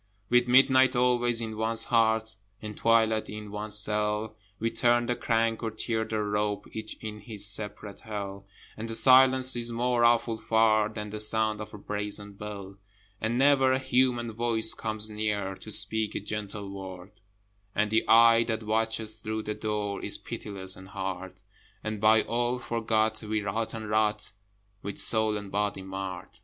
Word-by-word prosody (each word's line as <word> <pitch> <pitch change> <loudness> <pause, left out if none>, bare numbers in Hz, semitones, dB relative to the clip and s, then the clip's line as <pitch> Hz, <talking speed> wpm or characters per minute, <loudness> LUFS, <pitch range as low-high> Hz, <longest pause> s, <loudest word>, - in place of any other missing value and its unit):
With 120 0 +3
midnight 130 +1 +4
always 120 -1 +1
in 110 -1 -6
one's 115 +1 +5
heart, 110 -2 +1 0.2
And 105 -1 -8
twilight 110 -1 +1
in 105 -1 -8
one's 105 0 +5
cell, 105 +1 +3 0.2
We 115 +2 -2
turn 120 0 +2
the 125 - -1
crank, 115 -1 -1
or 115 - -2
tear 110 0 -3
the 110 -1 -3
rope, 105 0 -2
Each 110 0 -6
in 105 -1 -7
his 105 -1 +2
separate 105 -1 +2
Hell, 100 -2 -7 0.3
And 115 +1 -7
the 115 - -1
silence 130 +2 +6
is 120 0 -2
more 120 +1 0
awful 115 -1 +2
far 110 -1 +2
Than 105 -1 -7
the 105 - -6
sound 110 0 0
of 105 - -9
a - - -9
brazen 105 0 -4
bell. 100 -1 -9 0.4
And 110 +2 -1
never 135 -1 +4
a - - +2
human 125 -3 0
voice 110 0 +1
comes 110 -1 -2
near 105 -2 -2
To - - -10
speak 110 +1 +1
a - - -1
gentle 105 -1 -6
word: 95 -1 -9 0.6
And 105 0 0
the 110 - +2
eye 115 0 +6
that 110 -1 -3
watches 110 0 -2
through 110 0 -4
the 105 - -4
door 105 -1 -4
Is - - -1
pitiless 95 -3 -4
and 95 - -13
hard: 95 -1 -6 0.4
And 110 -1 -5
by 110 0 +4
all 120 +1 -1
forgot, 110 -2 -1
we 110 -1 -3
rot 110 +3 -3
and 110 -1 -7
rot, 105 0 0 0.5
With 100 - -7
soul 110 -1 +1
and 100 -1 -9
body 100 -1 -2
marred. 95 -1 -7
110 Hz, 170 wpm, -27 LUFS, 105-115 Hz, 0.6 s, silence